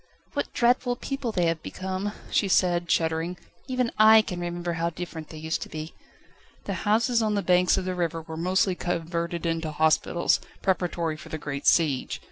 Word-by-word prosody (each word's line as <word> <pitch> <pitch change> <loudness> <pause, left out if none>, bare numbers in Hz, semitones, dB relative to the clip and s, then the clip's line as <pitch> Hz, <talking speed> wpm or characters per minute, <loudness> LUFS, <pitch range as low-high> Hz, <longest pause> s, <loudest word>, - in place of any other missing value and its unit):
"What - - -2
dreadful 245 +1 +2
people 275 -1 -3
they 180 -5 +1
have 165 -1 0
become," 190 +4 -4 0.2
she 200 - +2
said, 175 -2 +2
shuddering; 165 +2 0 0.3
"even 255 -2 0
I 220 0 +8
can 180 -4 -5
remember 175 0 -3
how 170 0 0
different 165 -2 -7
they 160 - -9
used 160 +1 -2
to - - -6
be." 155 +1 -6 0.7
The - - -2 0.2
houses 230 +2 +3
on 215 -1 +1
the 200 - 0
banks 180 0 +4
of 185 - -2
the 185 - -1
river 165 -2 -2
were 160 0 -8
mostly 185 +3 +1
converted 170 -1 -3
into 165 -1 -1
hospitals, 160 +2 +2 0.2
preparatory 175 -4 0
for 160 +1 -12
the 155 - -4
great 140 -2 -4
siege. 150 -6 +2
175 Hz, 180 wpm, -26 LUFS, 165-190 Hz, 0.7 s, I